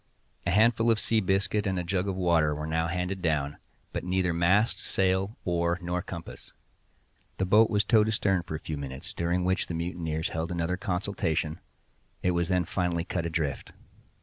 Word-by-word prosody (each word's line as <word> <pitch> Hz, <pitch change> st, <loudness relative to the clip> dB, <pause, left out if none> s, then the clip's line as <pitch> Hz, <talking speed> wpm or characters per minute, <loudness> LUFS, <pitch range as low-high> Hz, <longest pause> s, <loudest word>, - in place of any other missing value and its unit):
A -, -, +2 dB
handful 115 Hz, +4 st, +4 dB
of 115 Hz, -2 st, +3 dB
sea 110 Hz, +1 st, +2 dB
biscuit 95 Hz, +2 st, +1 dB
and 95 Hz, -1 st, 0 dB
a 90 Hz, -, -1 dB
jug 90 Hz, +2 st, -1 dB
of 95 Hz, -, -1 dB
water 85 Hz, -5 st, +2 dB
were 75 Hz, +1 st, -4 dB
now 80 Hz, +1 st, 0 dB
handed 90 Hz, +2 st, -2 dB
down; 75 Hz, -4 st, 0 dB, 0.4 s
but -, -, -3 dB
neither 90 Hz, -1 st, +1 dB
mast, 90 Hz, +7 st, +2 dB
sail, 95 Hz, +3 st, +1 dB
oar, 85 Hz, 0 st, +1 dB
nor 90 Hz, 0 st, -2 dB
compass. 85 Hz, -2 st, -9 dB, 0.8 s
The 95 Hz, -, +1 dB
boat 105 Hz, +4 st, +5 dB
was 105 Hz, -2 st, +2 dB
towed 110 Hz, -1 st, +4 dB
astern 100 Hz, -4 st, +1 dB
for 80 Hz, -, -6 dB
a -, -, -4 dB
few 80 Hz, -1 st, -5 dB
minutes, 65 Hz, -1 st, -6 dB
during 85 Hz, +1 st, 0 dB
which 95 Hz, +1 st, +1 dB
the 85 Hz, -, -4 dB
mutineers 85 Hz, -1 st, -2 dB
held 80 Hz, +2 st, -3 dB
another 85 Hz, +1 st, -1 dB
consultation—it 90 Hz, -2 st, -3 dB
was 85 Hz, 0 st, 0 dB
then 90 Hz, -2 st, +2 dB
finally 85 Hz, -1 st, -1 dB
cut 85 Hz, -1 st, -2 dB
adrift. 80 Hz, -5 st, -3 dB
90 Hz, 175 wpm, -28 LUFS, 85-95 Hz, 0.8 s, boat